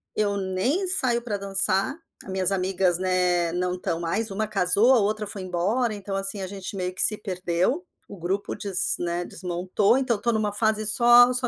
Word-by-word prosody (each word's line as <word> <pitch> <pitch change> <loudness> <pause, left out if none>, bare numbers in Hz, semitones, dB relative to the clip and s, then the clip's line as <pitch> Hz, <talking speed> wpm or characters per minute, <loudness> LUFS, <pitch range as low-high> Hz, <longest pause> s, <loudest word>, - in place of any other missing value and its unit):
eu 205 -1 0
nem 200 - -1
saio 260 -11 +1
pra 225 -4 -4
dançar. 195 +5 +1 0.3
As 190 - -9
minhas 190 0 0
amigas, 185 -2 0
né, 180 -2 0
não 180 0 -2
estão 180 -2 -4
mais 175 +7 -2
Uma 205 +2 -3
casou, 205 +4 +3
a 250 - +4
outra 215 +1 -1
foi 205 -1 -5
embora. 200 +6 -1
Então, 200 -1 -6
assim, 195 +1 +1
a 190 - -4
gente 195 +1 -7
meio 180 -1 -4
que 185 - -2
se 215 - +5
perdeu. 185 - -2 0.2
O - - -11
grupo 190 +3 -4
des 195 -3 +2
né, 175 0 -3
desmontou. 185 +6 -1
Então, 260 -3 0
eu - - -8
estou 235 +3 -1
numa 215 -2 -1
fase 215 0 0
só 240 +3 +6
só 250 0 +1
195 Hz, 200 wpm, -24 LUFS, 185-220 Hz, 0.3 s, só